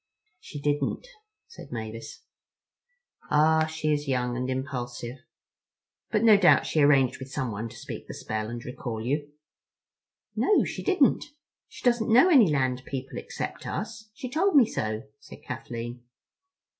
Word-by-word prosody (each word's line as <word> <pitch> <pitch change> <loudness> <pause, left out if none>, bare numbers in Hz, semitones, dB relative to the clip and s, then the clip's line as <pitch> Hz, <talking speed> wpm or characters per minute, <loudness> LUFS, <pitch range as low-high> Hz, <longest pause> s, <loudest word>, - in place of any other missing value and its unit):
"She 145 - -9
didn't," 145 - -1 0.4
said 465 - -12
Mavis. 115 -1 -7 1.1
"Ah, 155 +1 +4
she 155 -1 -1
is 145 0 -2
young 125 -2 0
and 125 +1 -2
impulsive. 125 -2 -4 0.9
But 210 - +1
no 220 -3 +8
doubt 185 -3 +5
she 155 - +1
arranged 140 -3 +4
with 130 0 -8
someone 115 -4 -3
to 120 - -13
speak 115 - -8
the - - -7
spell 110 0 -4
and 120 0 -7
recall 115 -3 -5
you?" 145 +3 -1 1.0
"No, 420 - +3
she - - -5
didn't. 360 -9 +3 0.4
She - - -13
doesn't 240 -2 +2
know 255 +11 +7
any 255 - +7
land 130 -3 0
people 135 0 -5
except - - -6
us. 215 0 -5
She 260 - -6
told 325 +8 +1
me 270 -5 +8
so," 110 - -3 0.2
said - - -14
Kathleen. 120 +1 -6
140 Hz, 145 wpm, -27 LUFS, -, 1.1 s, no